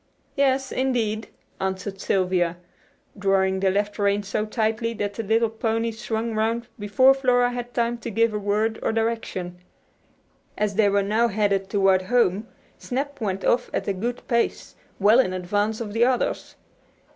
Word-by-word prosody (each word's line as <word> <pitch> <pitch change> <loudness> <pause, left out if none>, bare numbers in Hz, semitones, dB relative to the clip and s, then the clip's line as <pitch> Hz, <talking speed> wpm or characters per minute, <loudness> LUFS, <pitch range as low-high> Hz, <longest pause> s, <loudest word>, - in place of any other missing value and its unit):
"Yes, 270 -2 +1
indeed," 230 -4 -1 0.3
answered 190 +1 -3
Sylvia, 180 -3 +1 0.6
drawing 195 -1 +1
the 190 0 +2
left 205 +2 -1
rein 200 0 +1
so 210 +2 -2
tightly 225 +1 -1
that 205 -1 -3
the 225 - -4
little 225 +2 +2
pony 225 +1 -1
swung 225 0 -3
round 225 +2 -1
before 205 +6 +5
Flora 250 -2 +2
had 245 0 -5
time 235 0 0
to 235 - -5
give 230 0 +2
a 210 - -1
word 210 +2 0
of 220 - -1
direction. 225 -6 -2 1.0
As 210 -1 0
they 205 0 +3
were 200 0 +2
now 220 +4 +2
headed 200 -2 0
toward 195 -2 +3
home 215 0 +1 0.3
"Snap" 280 +1 -4
went 195 -3 -2
off 245 +1 +2
at - - -2
a 200 - +1
good 235 +6 -4
pace, 235 -2 -1 0.3
well 210 +5 +5
in 185 -8 +2
advance 205 +4 -1
of 215 -3 -5
the 225 +1 +3
others. 255 -1 -1
215 Hz, 160 wpm, -24 LUFS, 200-235 Hz, 1.0 s, before